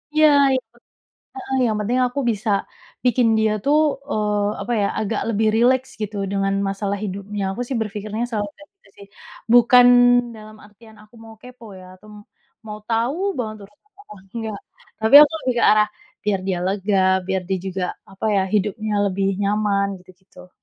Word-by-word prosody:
Iya, 310 0 +6 0.3
itu. 240 -2 -6 0.6
Heeh. 265 0 -5
Yang 220 -2 0
penting 240 +5 -1
aku 250 +3 -5
bisa 215 0 -4 0.6
bikin 245 -1 +3
dia, 220 0 +2
tuh, 290 +2 +3 0.3
eee, 210 -3 0
apa, 240 - -5
ya, 200 - +1
agak 215 +1 -2
lebih 220 0 +1
rileks, 255 +3 +2
gitu, 210 0 -4 0.2
dengan 195 0 0 0.2
masalah 200 0 -3
hidupnya. 200 +1 -5
Aku, 245 - -5
sih, 260 - -3
berpikirnya 215 +2 -4
selalu 205 -3 -3
kayak 295 - -16
gitu, 395 - -28
sih. 200 - -14 0.5
Bukan 245 +1 +7 0.5
dalam 215 0 -13
artian 220 +1 -18
aku 210 - -24
mau 225 0 -13
kepo, 250 -2 -14
ya, 185 - -13
atau 200 +3 -20 0.6
mau 210 -1 -8
tau 235 +6 0 0.2
banget 220 -3 -4
urusan 210 - -29
orang, 200 - -15
enggak. 220 -3 -5 0.4
Tapi 220 +2 -1
aku 300 - +5
lebih 255 - -1
ke - - +1
arah, 210 0 +4 0.4
biar 205 -2 0
dia 185 - -1
lega, 195 +1 -1 0.3
biar 190 -1 -1
dia 190 - 0
juga, 190 0 -3 0.3
apa, 195 - -6
ya, 195 - +3
hidupnya 210 +1 -1
lebih 195 0 -1 0.2
nyaman, 200 -1 0 0.2
gitu-gitu. 185 0 -18
215 Hz, 170 wpm, -21 LUFS, 200-235 Hz, 0.6 s, Bukan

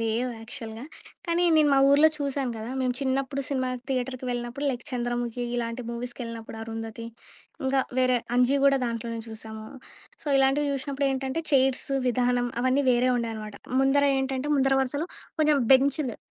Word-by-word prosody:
లేవు 230 +3 0
యాక్చవల్‌గా. 225 0 -8 0.4
కానీ 340 +1 +2
నేను 305 -1 +5
మా - - +5
ఊరిలో 295 +3 +7
చూశాను 280 -3 -2
గదా! 220 +2 -6
మేము 255 -1 +1
చిన్నప్పుడు 270 +1 -1
సినిమా 260 -2 -1 0.2
థియేటర్‌కెళ్ళినప్పుడు 250 0 -3
లైక్ 245 -2 -5
'చంద్రముఖి' 240 -1 -2
ఇలాంటి 235 +1 -3
మూవీస్‌కెళ్ళినప్పుడు, 235 -2 -6
'అరుంధతి' 225 0 -6 0.6
ఇంకా 265 0 +2 0.2
వేరే 255 -1 +3 0.2
'అంజి' 250 +3 +3
గూడా 275 -1 +5
దాంట్లోనే 230 0 -4
జూశాము. 220 -1 -8 0.6
సో - - -17
ఇలాంటివి 270 +2 +3
జూసినప్పుడేంటంటే 275 +1 -1
చైర్స్ 265 -2 +2 0.2
విధానం 245 0 +1
అవన్నీ 260 +3 +2
వేరే 245 +1 +3
ఉండేయనమాట. 220 -3 -4 0.3
ముందర 270 +1 +3
ఏటంటే 265 +1 -2
ముందర 270 0 +3
వరసులో 285 +5 -2 0.3
కొంచెం 305 -1 +4 0.2
బెంచ్లు. 270 -1 +3
255 Hz, 135 wpm, -26 LUFS, 235-275 Hz, 0.6 s, ఊరిలో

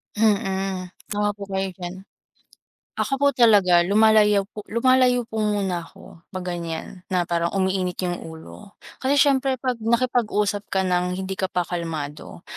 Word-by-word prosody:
Mm. 195 -3 0 0.2
Tama 205 0 0
po 200 - -8
kayo 190 -1 -2
diyan. 185 +2 -8 0.9
Ako 270 - 0
po 285 - +3
talaga 205 -8 +5
lumalayo 210 +1 +4
po 210 +1 -11
lumalayo 250 +1 +3
po 220 -1 -5
muna 200 -4 0
ako 170 - -15
'pag 185 -1 -6
ganyan, 170 +1 -5
na 180 -2 +1
parang 170 0 0
umiinit 185 -1 0
'yong 175 -1 -2
ulo. 165 +5 -11 0.3
Kasi 265 +2 +2
siyempre 270 -1 +3
'pag 250 -1 -2
nakipag-usap 220 -3 0
ka 190 -1 +1
ng 180 0 0
hindi 190 0 -4
ka 190 - +1
pa 180 - 0
kalmado, 165 -2 -5
195 Hz, 150 wpm, -23 LUFS, 180-220 Hz, 0.9 s, talaga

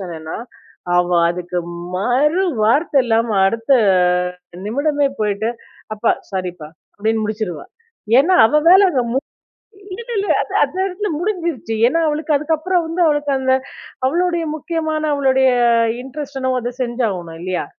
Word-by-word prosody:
சொன்னேன்னா, 160 -4 -6 0.6
அவ 175 0 +2 0.2
அதுக்கு 180 0 -4 0.4
மறுவார்த்த 280 - +2
இல்லாம 230 0 +1 0.2
அடுத்த 230 +6 0 0.9
நிமிடமே 285 +4 +1
போயிட்டு 210 +2 0 0.5
அப்பா - - +2 0.2
ஸாரிப்பா 180 -5 -5 0.3
அப்டின்னு 220 +1 0
முடிச்சுருவா. 210 -7 -4 0.5
ஏன்னா, 345 +7 +4
அவ 300 - +1
வேல 385 +1 +7
அங்க 265 -7 +1
மு 265 - +2 0.8
இல்ல 470 - -14
இல்ல 400 0 -1
அது - - -6
அந்த - - -4
இடத்துல 395 +2 -4
முடிஞ்சிருச்சு. 340 - -2
ஏன்னா, 330 +6 +1
அவளுக்கு 300 0 0
அதுக்கப்புறம் 325 +4 0
வந்து 330 +2 -2
அவளுக்கு 295 -1 0
அந்த 260 0 +2 0.5
அவளுடைய 345 +2 0
முக்கியமான 315 0 -3
அவளுடைய 265 -1 +3 0.5
இன்ட்ரெஸ்ட் 275 +1 -7
என்னவோ 260 -1 0
அத 245 +1 -4
செஞ்சாவணும் 200 -9 -3
இல்லையா? 185 0 -2
265 Hz, 125 wpm, -18 LUFS, 215-315 Hz, 0.9 s, வேல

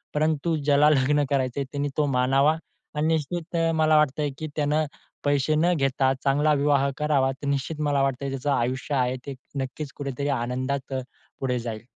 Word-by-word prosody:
परंतु 155 +2 +1
ज्याला 145 +1 +5
लग्न 145 0 +3
करायचं 135 0 0
त्याने 145 0 -1
तो 150 - +3
मानावा 135 +4 +3 0.4
आणि 155 +1 +1
निश्चित 165 +2 -2 0.2
मला 155 0 +4
वाटतंय, 150 0 +2
की 155 - -4
त्यानं 150 +1 +1 0.4
पैसे 145 +1 +2
न 175 +3 +3
घेता 135 -2 +2
चांगला 145 +2 +3
विवाह 140 -1 +2
करावा. 145 -3 +2
तर 140 +2 -7
निश्चित 140 +3 -2
मला 145 -2 +2
वाटतं 135 0 -1
त्याचं 135 +2 -2
आयुष्य 130 +2 -1
आहे 125 -1 +1
ते 140 -1 -5 0.3
नक्कीच 135 +2 -5
कुठेतरी 140 0 -3
आनंदात 130 +3 -3
पुढे 130 0 -4
जाईल. 115 -1 -6
140 Hz, 160 wpm, -25 LUFS, 130-150 Hz, 0.4 s, ज्याला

